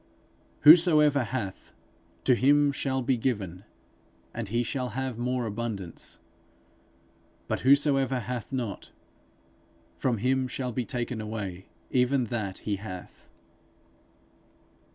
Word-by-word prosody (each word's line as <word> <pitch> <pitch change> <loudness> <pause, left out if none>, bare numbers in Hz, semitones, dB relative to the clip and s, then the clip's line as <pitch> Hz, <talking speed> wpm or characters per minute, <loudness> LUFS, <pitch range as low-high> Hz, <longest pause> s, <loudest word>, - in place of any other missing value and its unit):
'Whosoever 150 -4 +7
hath, 110 -5 -5 0.5
to 130 - +4
him 145 +4 +4
shall 135 -2 -1
be 130 0 +1
given, 100 -6 -3 0.7
and 115 -2 -4
he 120 +4 0
shall 125 +1 -3
have 130 -3 -3
more 125 0 -1
abundance; 105 -5 -4 1.3
but - - -1
whosoever 135 -1 +3
hath 125 0 -5
not, 120 -6 -4 1.0
from 125 -3 -1
him 130 +4 +1
shall 125 0 -3
be 120 +1 -2
taken 120 -2 -3
away 100 -4 -5 0.2
even 125 +1 +2
that 100 -5 -2
he 105 -2 -1
hath.' 95 -3 -10
125 Hz, 110 wpm, -28 LUFS, 110-130 Hz, 1.3 s, Whosoever